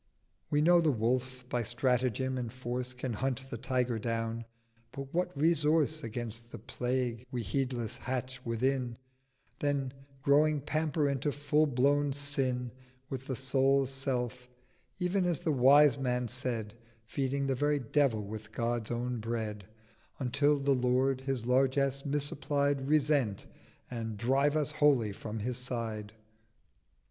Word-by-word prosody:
We 145 - +2
know 175 +2 +6
the 160 - +3
Wolf: 125 +2 -1
by 125 -1 0
Strategem 125 +1 +1
and 120 -3 -3
Force 125 0 -3
Can 125 -1 -4
hunt 135 +3 -2
the 120 - -3
Tiger 125 -2 0
down: 115 0 -2 0.5
but 135 -1 -7
what 180 +1 +1
Resource 155 -1 +3
Against 115 0 -5
the - - -6
Plague 125 +1 -2
we 125 -3 -3
heedless 120 +1 -2
hatch 130 0 -4
within, 120 +1 0 0.6
Then, 140 -3 0 0.3
growing, 150 +1 +4
pamper 155 0 0
into 140 +1 0
full 145 +2 +2
blown 140 +2 +2
Sin 135 -3 -1
930 130 - -24 0.3
With 135 -1 -5
the 130 - -2
Soul's 135 +1 +2
self: 125 -2 -3 0.5
ev'n, 180 +1 +1
as 175 -4 0
the 160 - +1
wise 140 +1 +6
man 125 -2 0
said, 115 -3 -3 0.3
Feeding 140 +4 -1
the 135 - +1
very 145 +3 +1
Devil 130 -3 +1
with 105 +1 -8
God's 115 -1 -1
own 120 0 -2
Bread; 110 -3 -3 0.5
Until 145 +3 +2
the 140 0 +2
Lord 130 +1 +2
his 135 -3 -2
Largess 135 +2 +2
misapplied 145 -1 0
Resent, 145 -8 +2 0.5
and 115 -3 -4
drive 135 +6 +2
us 150 -1 +1
wholly 140 -8 +3
from 105 +2 -6
his 120 +3 -3
Side? 115 -4 -4
130 Hz, 140 wpm, -31 LUFS, 120-140 Hz, 0.6 s, know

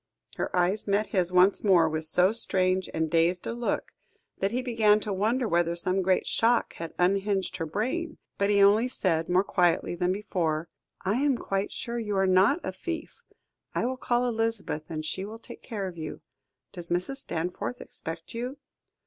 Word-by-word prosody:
Her - - -1
eyes 185 +5 +1
met 205 +2 +1
his 180 -3 +1
once 185 +2 +4
more, 180 -6 +5
with 155 0 -2
so 180 +4 +3
strange 185 -4 +1
and 160 0 0
dazed 170 +2 +2
a - - -2
look, 240 0 -2 0.5
that 195 - +1
he 250 +4 -2
began 220 -4 +3
to 210 - -2
wonder 225 +6 +1
whether 170 -2 +1
some 185 +2 +2
great 185 0 +2
shock 235 +1 +2
had 165 -1 -7
unhinged 195 +1 +1
her 165 - -3
brain, 260 - -2 0.2
but 200 0 +2
he 200 -1 +5
only 210 +5 +5
said, 170 -9 0
more 180 +2 +4
quietly 175 -4 +1
than 180 +1 0
before: 170 -5 -2 0.4
"I 200 +5 +1
am 275 -1 +2
quite 195 -2 -2
sure 235 -1 -4
you 210 -3 -2
are 195 - +3
not 190 - +4
a - - -3
thief. - - -6 0.5
I - - +1
will 260 +1 -1
call 245 -1 0
Elizabeth, 225 -9 -2
and 155 -1 -4
she 185 +4 -3
will 215 +3 -7
take 230 - -12
care 210 -5 -4
of 175 -2 -8
you. 155 -1 -6 0.5
Does 175 -1 -8
Mrs. 180 +11 -1
Stanforth 180 +2 -2
expect 165 0 -7
you?" 250 +4 -4
195 Hz, 185 wpm, -27 LUFS, 175-225 Hz, 0.5 s, more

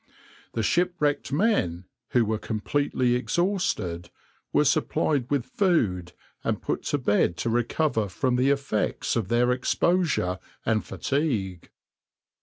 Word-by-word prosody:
The 115 - -1
shipwrecked 170 - +1
men, 140 - +1 0.2
who 120 -2 +3
were 110 0 -1
completely 125 +3 0
exhausted, 125 - -1 0.4
were - - +3
supplied 135 -5 +1
with 140 -4 0
food 110 - 0 0.3
and - - -1
put - - -2
to 145 - +1
bed 105 -8 +1
to 115 - -1
recover 120 -1 +1
from 125 +6 0
the 130 +2 +3
effects 135 -6 0
of 115 -5 -1
their 120 +3 +2
exposure 125 - +1 0.3
and 110 -1 +1
fatigue. 110 - -2
125 Hz, 120 wpm, -26 LUFS, 105-145 Hz, 0.4 s, who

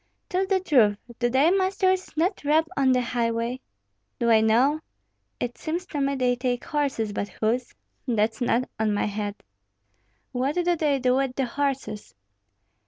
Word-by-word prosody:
"Tell 375 +1 0
the 385 -1 +2
truth; 240 - +3 0.2
do 240 0 +2
thy 270 +7 +4
masters 375 -1 +1
not 355 +3 0
rob 310 +3 +3
on 270 -2 +3
the 250 -1 +3
highway?" 235 +1 -1 0.6
"Do 235 -2 +2
I 220 -1 +6
know? 245 +8 +3 0.6
It 245 0 -4
seems 340 +3 -3
to 295 -6 -4
me 275 0 +1
they 250 -2 +1
take 245 -1 -2
horses, 275 -8 -1
but 205 0 -3
whose, 235 +5 -2 0.3
that's 220 -1 0
not 245 +1 +1
on 215 -1 +1
my - - 0
head." 205 0 -3 1.0
"What 265 +4 -1
do 355 - +1
they 300 -4 +1
do 255 0 +2
with 270 -2 -1
the 270 - 0
horses?" 265 -5 -3
255 Hz, 165 wpm, -25 LUFS, 230-295 Hz, 1.0 s, I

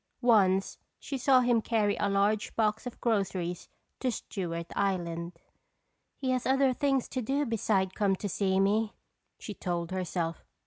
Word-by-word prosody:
Once 195 -5 +3 0.2
she 280 - -5
saw 260 0 +4
him 240 -2 +3
carry 215 -3 +1
a 205 - 0
large 205 +2 +1
box 220 +1 0
of 245 - -8
groceries 190 -6 -1 0.3
to 255 - 0
Stewart 170 -6 -4
Island. 175 -3 -1 0.8
"He 260 -1 -1
has 255 -1 0
other 265 0 +3
things 270 -1 +1
to 260 - -2
do 275 +5 0
besides 210 -5 +1
come 195 -1 +1
to 205 - -4
see 190 0 +1
me," 210 +2 +2 0.4
she 210 - -7
told 175 -3 -3
herself. 175 -3 -2
205 Hz, 150 wpm, -29 LUFS, 185-240 Hz, 0.8 s, saw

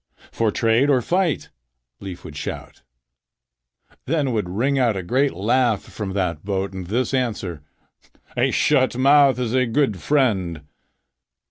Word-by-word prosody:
"For 115 -1 0
trade 115 +6 +2
or 135 -3 +4
fight?" 180 -1 0 0.5
Leif 95 -3 -8
would 75 - -9
shout. - - -7 1.3
Then 145 -2 0
would 105 -6 -2
ring 130 +9 0
out 115 -5 +2
a 95 - -4
great 130 +9 +1
laugh 115 +1 +1
from 100 -3 -6
that 90 -5 -2
boat 95 -1 -2
and 95 -2 -6
this 125 +7 -1
answer: 105 - -2 0.7
"A - - +2
shut 130 -4 +2
mouth 140 -1 +5
is 125 -2 -2
a 130 -1 +2
good 115 -5 0
friend." 100 - +1
115 Hz, 140 wpm, -22 LUFS, 95-135 Hz, 1.3 s, mouth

